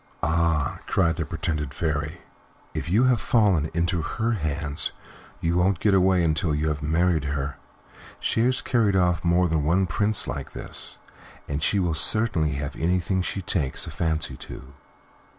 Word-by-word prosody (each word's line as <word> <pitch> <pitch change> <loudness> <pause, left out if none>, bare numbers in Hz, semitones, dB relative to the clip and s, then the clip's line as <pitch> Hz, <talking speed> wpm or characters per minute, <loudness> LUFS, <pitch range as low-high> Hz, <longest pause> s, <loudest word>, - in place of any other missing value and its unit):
"Ah!" 80 -1 +1
cried 85 -4 +2
the - - -1
pretended 75 -4 -3
Fairy, 80 +1 -2 0.5
"if 75 - -4
you 105 +8 +4
have 130 -3 +3
fallen 95 -10 +2
into 85 +1 0
her 115 +8 -1
hands, 75 -6 -2 0.5
you 85 +1 +1
won't 95 +1 +2
get 105 0 +2
away 95 -1 +4
until 80 0 +1
you 75 +1 0
have 75 -1 -2
married 80 +1 +1
her. 70 -1 -3 0.6
She - - 0
has 130 +1 +1
carried 110 -5 +2
off 90 -2 +2
more 85 +1 +3
than 80 -3 0
one 90 +5 +2
Prince 105 +4 +1
like 70 -1 -5
this, - - -7 0.5
and 75 0 -3
she 100 - +1
will 90 -4 +1
certainly 85 -3 +2
have 70 +1 -4
anything 90 +2 0
she 95 +1 -3
takes 75 -7 0
a - - -7
fancy 80 -4 -1
to." 65 +2 -11
85 Hz, 165 wpm, -25 LUFS, 75-95 Hz, 0.6 s, you